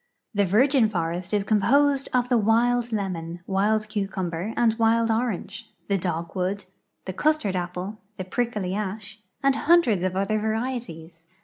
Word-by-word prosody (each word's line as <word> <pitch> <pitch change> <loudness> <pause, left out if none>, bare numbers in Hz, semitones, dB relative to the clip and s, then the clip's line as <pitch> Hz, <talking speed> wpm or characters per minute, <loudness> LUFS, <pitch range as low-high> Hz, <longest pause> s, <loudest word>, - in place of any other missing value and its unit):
'I'he 200 0 +3
virgin 240 +4 +4
forest 175 -1 -3
is 205 -2 +1
composed 270 +7 +2
of 250 -1 +1
the 250 -1 +3
wild 235 +2 +2
lemon, 175 -5 -3
wild 215 +2 +1
cucumber, 195 -3 -3
and 235 -2 +3
wild 230 0 +3
orange, 220 -3 -3 0.2
the 200 - +2
dogwood, 180 +3 -3 0.4
the 185 - -4
custard 300 -4 +1
a)iple, 180 +3 -4 0.2
the 185 - -3
prickly 210 -3 -2
ash, 210 +1 -5 0.2
and 275 0 +4
hundreds 290 - +3
of 185 0 -1
other 200 +3 0
varieties. 215 -8 -4
210 Hz, 140 wpm, -25 LUFS, 185-230 Hz, 0.4 s, virgin